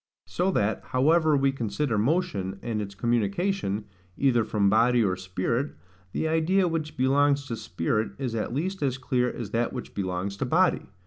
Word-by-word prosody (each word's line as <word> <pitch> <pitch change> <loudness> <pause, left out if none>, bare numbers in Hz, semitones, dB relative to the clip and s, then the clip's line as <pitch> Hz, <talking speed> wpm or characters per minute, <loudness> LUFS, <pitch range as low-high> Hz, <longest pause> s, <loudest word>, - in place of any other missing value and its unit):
So 180 +2 0
that, 105 -3 +1
however 155 +3 +3
we 135 0 +3
consider 120 0 -2
motion, 110 - 0
and 110 -3 -2
its 100 -1 -6
communication, 115 - 0 0.3
either 125 -4 +3
from 105 -2 +1
body 115 +3 +4
or 95 -3 +1
spirit, 95 +9 -2 0.4
the 160 - -1
idea 165 +4 +2
which 160 -2 -3
belongs 140 +2 +3
to 120 - -4
spirit 105 0 -2
is 125 -4 -3
at 110 -1 -2
least 185 +9 -2
as 135 -3 0
clear 125 -2 0
as 110 -4 -6
that 115 +1 0
which 125 - -6
belongs 95 0 -3
to 135 - -1
body. 175 +8 +2
125 Hz, 170 wpm, -26 LUFS, 105-150 Hz, 0.4 s, body